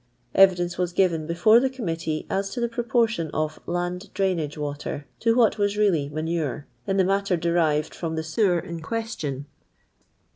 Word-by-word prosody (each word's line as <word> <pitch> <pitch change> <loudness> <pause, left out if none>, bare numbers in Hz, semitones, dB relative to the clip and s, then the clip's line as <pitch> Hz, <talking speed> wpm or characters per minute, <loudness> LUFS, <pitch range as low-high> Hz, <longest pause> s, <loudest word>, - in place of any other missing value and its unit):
Bvidence 180 -2 +4
was 180 -1 0
given 170 -5 +1
before 175 +7 +5
the 265 +2 +1
committee 165 -11 -3
as 195 +1 -1
to 195 - -5
the 235 - +1
proportion 230 -7 0
of 155 0 -1
"land 175 +3 -3
drainage 170 -7 0
leoter" 145 -1 -4
to 230 0 +2
what 230 -3 +3
was 205 0 +1
really 175 -9 +2
vmanurtt 155 -2 -2 0.2
in 195 0 +1
the 190 - +5
matter 195 -1 +1
derived 160 -3 +1
from 165 -2 -4
the 160 - -2
sewer 175 +3 +2
in 170 0 -5
question. 160 - -4
175 Hz, 160 wpm, -25 LUFS, 160-205 Hz, 0.2 s, before